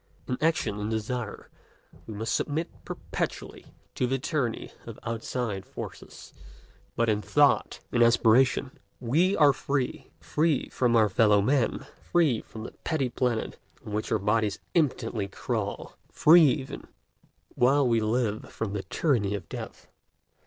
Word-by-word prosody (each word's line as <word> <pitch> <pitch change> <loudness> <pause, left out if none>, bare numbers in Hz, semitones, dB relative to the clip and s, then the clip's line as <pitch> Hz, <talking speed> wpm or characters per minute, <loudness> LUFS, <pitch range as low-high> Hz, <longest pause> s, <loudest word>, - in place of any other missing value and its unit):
In 125 - -1
action, 160 -10 +1
in 105 +1 -3
desire, 110 0 -4 0.6
we 110 - -7
must 110 +2 -2
submit 155 +3 -1
perpetually - - -5 0.3
to 125 - 0
the 135 +2 0
tyranny 130 -3 -2 0.2
of - - -8
outside 115 -3 -3
forces; - - -10 0.6
but 115 - +1
in 105 -1 +1
thought, 145 +5 +2
in 120 - +1
aspiration, 120 +3 +3 0.2
we 160 +11 +2
are 145 -3 +6
free, 135 -1 -3
free 155 -2 0
from 120 -2 +1
our 110 -2 +5
fellow 105 +1 +4
men, 125 +4 +1 0.2
free 155 -10 +2
from 110 - -10
the - - -7
petty 145 -6 0
planet 120 -2 -2 0.3
on 105 - -7
which 105 +1 -2
our - - +3
bodies 105 0 0 0.2
impotently 120 - 0
crawl, 100 - -4 0.2
free 165 +1 +7
even, 130 -1 -2 0.7
while 135 +2 +3
we 115 -1 +3
live, 110 -1 -1
from 110 -3 -4
the 105 - -2
tyranny 105 -7 0
of 90 -5 -7
death. - - -8
120 Hz, 140 wpm, -27 LUFS, 110-140 Hz, 0.7 s, free